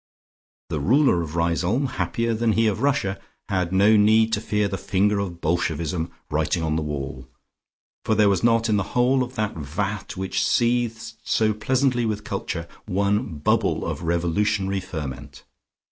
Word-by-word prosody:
The 80 - -2
ruler 120 - +3
of 80 -1 -6
Riseholme, 85 - +1
happier 115 -1 -1
than 110 0 +1
he 115 +1 +2
of 105 0 0
Russia, 140 -9 0 0.3
had 90 -2 0
no 100 +3 +5
need 110 +2 +4
to 105 - +1
fear 105 -2 0
the 95 - -3
finger 100 +3 +1
of 85 -4 -5
Bolshevism 80 0 -1 0.2
writing 80 +2 0
on 80 -1 0
the 80 - 0
wall, 70 -3 -5 0.8
for 110 - +1
there 105 -1 +4
was 100 +1 +1
not 115 -1 +3
in 105 -2 +2
the 100 - -4
whole 130 +2 +3
of 125 +1 -4
that 105 -1 -1
vat 95 +8 -4
which 95 -1 -1
seethed 120 -2 0
so 110 -1 +2
pleasantly 125 +2 +1
with 105 -1 -3
culture, 90 -4 -4 0.2
one 100 0 0
bubble 75 - +1
of - - -4
revolutionary 95 +4 0
ferment. 70 -7 -7
100 Hz, 160 wpm, -23 LUFS, 85-110 Hz, 0.8 s, no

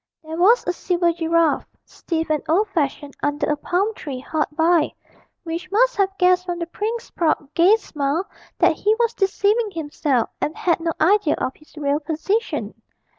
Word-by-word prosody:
There 315 0 -6
was 405 +9 +4
a 355 - 0
silver 345 -1 0
giraffe, 330 -1 +1 0.2
stiff 325 -2 -3
and 305 -2 +1
old 400 +6 +2
fashioned, 290 -5 -2
under 290 0 0
a - - +2
palm 365 +8 -1
tree 275 -10 -6
hard 305 +3 -1
by, 325 0 +2 0.5
which 340 +2 -5
must - - +3
have 390 -1 +1
guessed 365 0 +3
from 350 -1 -2
the 340 - -3
prince's 445 +7 -4
proud 310 -3 -1
gay 360 +6 +6
smile 310 -4 -2 0.3
that - - +3
he 425 +2 +2
was 465 0 +1
deceiving 415 +2 +1
himself 290 - -1
and 305 - -2
had 340 -2 +1
no 330 0 -1
idea 360 -1 +3
of 260 - -3
his 305 +1 -22
real 290 0 0
position. 330 +9 -2
340 Hz, 175 wpm, -22 LUFS, 305-395 Hz, 0.5 s, gay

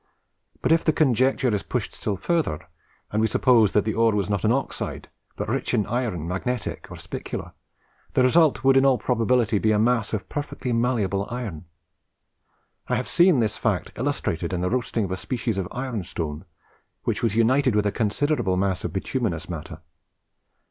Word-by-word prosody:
But - - +2
if 165 0 +4
the 155 - +2
conjecture 130 -3 +2
is 100 - 0
pushed - - -3
still 100 -2 -3
further, 160 - -1 0.4
and 110 - +1
we 110 - +3
suppose 115 -2 +4
that 105 - +3
the 110 - 0
ore 115 -1 +3
was 100 0 -1
not 100 - -1
an 110 - +3
oxide, 135 +2 -3 0.3
but - - -4
rich - - -1
in 105 - +1
iron, 110 -10 -2
magnetic 110 +6 -3
or - - -8
spicular, - - -6 0.6
the 130 - +3
result 150 0 +4
would 135 0 +5
in 135 - +5
all 135 -2 +4
probability 115 0 +1
be 110 - +2
a 105 - +3
mass 115 0 +2
of 105 -3 -3
perfectly 145 -4 -4
malleable 110 -5 0
iron. 110 -10 -5 1.2
I - - +1
have - - -2
seen 175 -7 +4
this 110 -2 -1
fact - - -1
illustrated 85 +2 -2
in 90 - -1
the 90 - 0
roasting 115 -3 0
of 95 - -6
a 95 - -1
species 115 0 -2
of 90 - -2
iron 125 -5 -3
stone, 75 -3 -5 0.6
which - - -1
was 115 -3 0
united 125 +2 +3
with 105 -1 +2
a 105 - +2
considerable 115 -1 0
mass 95 -1 0
of - - -3
bituminous 95 - -2
matter. 80 -4 -7
110 Hz, 185 wpm, -24 LUFS, 100-125 Hz, 1.2 s, would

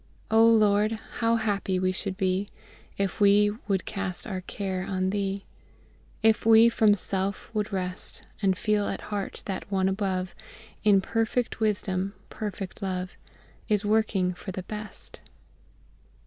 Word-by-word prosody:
"O 225 +1 +6
LORD, 215 -1 +5 0.3
how 230 0 +3
happy 205 -4 0
should 185 +1 -4
we 190 0 +1
be - - -18 0.5
If 195 0 -2
we 205 +1 +6 0.2
would 195 -3 0
cast 195 -3 -4
our 190 -3 -4
care 185 0 -3
on 190 -1 -1
Thee, 195 -1 -2 0.8
If 220 -1 +4
we 225 +1 +7
from 215 -3 +4
self 195 +2 -3
would 210 -1 -1
rest; 185 -1 -4 0.2
And 190 -2 +2
feel 210 0 +1
at - - -3
heart 200 -1 -3
that 195 +1 -5
One 190 -1 +2
above, 190 -2 -1 0.5
In 205 -2 +5
perfect 225 +3 -1
wisdom, 195 -2 0 0.2
perfect 205 -2 -5
love, 185 -1 -3 0.5
Is 210 -1 +2
working 205 -4 +2
for 190 +2 -7
the 185 0 -5
best!" 210 +1 -8
200 Hz, 140 wpm, -27 LUFS, 190-215 Hz, 0.8 s, we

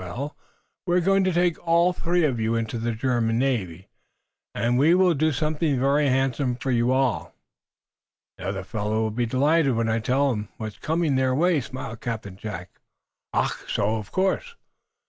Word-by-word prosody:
Well, 125 - -5 0.5
we 175 0 +3
are - - +5
going 195 +2 +3
to 185 - +2
take 175 -1 +1
all 170 +1 +3
three 175 0 0
of 130 -6 0
you 110 +1 0
into 115 0 -2
the 120 +1 -1
German 115 -1 0
navy, 100 -10 -1 0.7
and 120 +2 +1
we 160 +5 +5
will 185 -1 +4
do 155 +1 +1
something 150 0 0
very 140 +2 +2
handsome 130 -1 +1
for 130 +2 -3
you 120 +1 +2
all." 130 -2 0 1.0
"The 95 - -5
other 95 -1 -3
fellows 105 +2 -3
will 110 -1 0
be 120 +2 -1
delighted 140 +2 +2
when 115 0 0
I 110 +1 +1
tell 135 +4 +1
'em 105 -2 -4
what's 110 -3 -6
coming 160 -3 0
their 130 -1 +2
way," 165 0 +2
smiled 120 -3 -7
Captain 110 -5 -5
Jack. 95 -3 -8 0.5
"Ach! - - +1 0.2
So? 110 +2 +1
Of 105 -2 -8
course." 195 - 0
130 Hz, 180 wpm, -24 LUFS, 115-155 Hz, 1.0 s, are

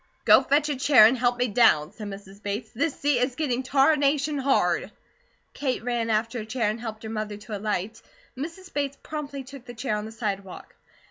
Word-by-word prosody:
"Go - - +8
fetch 295 +1 +2
a 290 - 0
chair 265 -4 +7
and 230 +4 +5
help 245 -1 +1
me 245 +1 +1
down," 195 -9 +4
said 210 0 -8
Mrs. 195 0 -10
Bates, 205 +3 -4
"this 285 +5 -1
seat 285 -3 +2
is 250 +1 0
getting 260 -5 -1
tarnation 280 +2 +2
hard." 270 0 +1 0.6
Kate 260 -5 -2
ran 240 -2 -1
after 225 +2 0
a 215 - -6
chair, 225 -2 0
and 220 - -6
helped 220 -2 -6
her 220 - -6
mother 215 -1 -4
to 210 +1 -7
alight. 210 +1 -3 0.3
Mrs. 335 +7 -7
Bates 280 -1 -2
promptly 285 -3 -5
took 265 -1 -12
the 240 - -10
chair, 225 -2 -2
on 210 0 -4
the 220 - -8
sidewalk. 200 -4 -5
245 Hz, 200 wpm, -25 LUFS, 215-275 Hz, 0.6 s, Go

